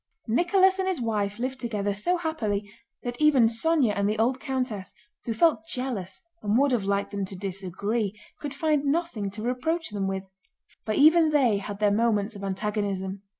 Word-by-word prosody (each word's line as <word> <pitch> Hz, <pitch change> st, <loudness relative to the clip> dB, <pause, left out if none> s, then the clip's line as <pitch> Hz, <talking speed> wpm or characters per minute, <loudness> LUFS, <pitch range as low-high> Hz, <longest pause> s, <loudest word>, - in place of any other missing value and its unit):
Nicholas 375 Hz, -, +3 dB
and 380 Hz, -, 0 dB
his 375 Hz, -5 st, 0 dB
wife 210 Hz, -3 st, -1 dB
lived 260 Hz, +2 st, -3 dB
together 205 Hz, -4 st, -1 dB
so 350 Hz, -, 0 dB
happily 220 Hz, -, -2 dB, 0.4 s
that 245 Hz, +3 st, -5 dB
even 290 Hz, -6 st, +6 dB
Sónya 240 Hz, +1 st, +2 dB
and 200 Hz, 0 st, +1 dB
the 215 Hz, -, -1 dB
old 250 Hz, +4 st, +1 dB
countess, 250 Hz, -8 st, -3 dB, 0.3 s
who 230 Hz, -, -1 dB
felt 225 Hz, -5 st, +3 dB
jealous 245 Hz, -8 st, -4 dB, 0.2 s
and 210 Hz, +2 st, +1 dB
would 280 Hz, +1 st, +3 dB
have 230 Hz, -6 st, +1 dB
liked 200 Hz, 0 st, 0 dB
them 200 Hz, -1 st, -2 dB
to 190 Hz, -, -9 dB
disagree, 200 Hz, +3 st, -3 dB, 0.2 s
could 285 Hz, -2 st, -5 dB
find 300 Hz, -1 st, +1 dB
nothing 285 Hz, -, -1 dB
to 210 Hz, +2 st, -7 dB
reproach 255 Hz, +6 st, -1 dB
them 200 Hz, -2 st, -2 dB
with; 190 Hz, 0 st, -2 dB, 0.6 s
but 215 Hz, -, -1 dB
even 315 Hz, +2 st, +6 dB
they 265 Hz, -9 st, +3 dB
had 200 Hz, 0 st, -6 dB
their 210 Hz, -1 st, +3 dB
moments 215 Hz, -1 st, +1 dB
of 200 Hz, -, -8 dB
antagonism. 195 Hz, -1 st, -2 dB
225 Hz, 180 wpm, -26 LUFS, 200-280 Hz, 0.6 s, even